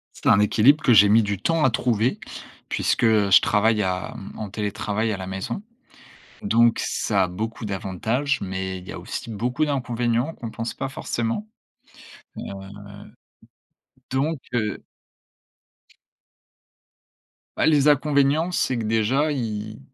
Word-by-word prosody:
C'est - - -12
un 100 - +6
équilibre 120 +8 +4
que 125 - +4
j'ai 100 -1 +7
mis 110 +2 +5
du 100 -2 -3
temps 165 -3 +1
à 130 - +5
trouver, 120 0 0 0.5
puisque - - 0
je 105 -4 +5
travaille 105 +1 +2
à, 95 -1 -2
hem, 95 - -9
en 105 -2 -5
télétravail 105 +1 -2
à 100 - -2
la 95 - -7
maison. 95 - -4 0.8
Donc, 120 - +3
ça 100 -4 0
a - - -3
beaucoup 110 +6 -5
d'avantages, 110 +8 -2
mais 95 -1 -4
il 90 - -13
y - - -7
a - - -7
aussi - - -6
beaucoup 125 +7 -1
d'inconvénients 125 0 -1
qu'on 115 - -7
pense 115 +1 -5
pas 135 - -4
forcément. 120 - -3 2.5
Heu, - - -29
donc 145 +5 0 0.2
heu 105 -4 -2 2.7
bah, - - +2
les 150 -2 +4
inconvénients, 145 +3 +2
c'est 130 -7 0
que 115 - -3
déjà 115 +8 +1
y 110 -5 -4
115 Hz, 140 wpm, -23 LUFS, 105-135 Hz, 2.7 s, j'ai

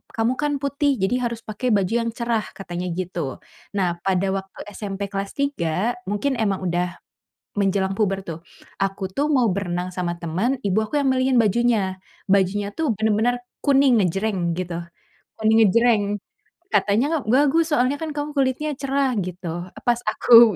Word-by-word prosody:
"Kamu 225 +2 +2
kan 295 -1 0
putih 280 0 +1
jadi 195 +6 +2
harus 230 -1 -6
pakai 220 +4 -2
baju 195 +1 +1
yang 230 - -1
cerah," 235 -1 0 0.2
katanya 180 -2 -5
gitu. 175 -6 -3 0.4
Nah 175 -3 +1
pada 190 0 +2
waktu 195 -1 -6
SMP 200 -1 -4
kelas 195 0 -3
3 225 - 0 0.2
mungkin 210 +7 0
emang 195 -4 0
udah 175 0 -1 0.6
menjelang 195 -1 +1
puber 195 -3 +1
tuh, 165 -3 -7 0.4
aku 195 0 -1
tuh 285 +8 0
mau 255 -5 +4
berenang 180 -2 -2
sama 180 -1 -2
teman, 185 +11 0
ibu 200 0 +1
aku 220 - -3
yang 280 - +2
milihin 260 0 +2
bajunya, 215 -3 +2 0.3
bajunya 200 +1 +2
tuh 315 -6 0
bener-bener 220 +3 +1 0.2
kuning 275 -3 +5
ngejreng 185 -1 0
gitu, 175 -2 -3 0.6
kuning 220 0 +4
ngejreng. 230 +1 +4 0.7
Katanya 275 +10 +2
bagus 295 +7 +3
soalnya 260 0 +2
kan 320 -1 -3
kamu 295 0 -2
kulitnya 275 +3 +1
cerah 275 -1 0
gitu, 175 -1 -5 0.2
pas 240 -1 +3
aku 230 -1 +7
210 Hz, 150 wpm, -23 LUFS, 185-255 Hz, 0.7 s, aku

